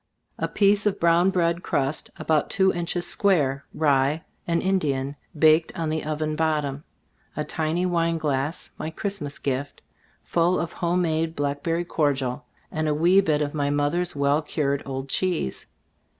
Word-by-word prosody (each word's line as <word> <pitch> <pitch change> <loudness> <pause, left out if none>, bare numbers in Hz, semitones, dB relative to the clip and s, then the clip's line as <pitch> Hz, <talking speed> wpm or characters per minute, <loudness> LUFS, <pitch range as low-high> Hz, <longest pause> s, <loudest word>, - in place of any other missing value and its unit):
A - - 0
piece 205 +1 +3
of 205 - 0
brown 170 +2 +4
bread 170 -2 +1
crust, 140 -3 -1
about 155 -2 +1
two 190 -1 +3
inches 175 0 -1
square, 145 -9 +2
rye 145 +1 +2 0.2
and 170 -1 +2
Indian, 145 -8 0 0.2
baked 155 +1 +5
on 165 -2 -1
the 160 0 -2
oven 155 0 -2
bottom; 150 -3 -1 0.5
a 150 - 0
tiny 160 +4 -1
wine 165 -2 +1
glass, 145 0 -2
my 155 - -3
Christmas 160 -5 -4
gift, 140 +1 -3 0.4
full 175 +2 +2
of 170 - -3
home 175 +1 0
made 160 0 0
blackberry 145 +4 -1
cordial, 135 -5 -1 0.3
and 155 0 -1
a 150 - +1
wee 175 +5 +5
bit 150 -5 +1
of 145 - -3
my 145 -2 0
mother's 145 +5 0
well 140 +2 +2
cured 140 -2 -1
old 135 0 -4
cheese. 170 - -1
155 Hz, 155 wpm, -25 LUFS, 145-170 Hz, 0.5 s, baked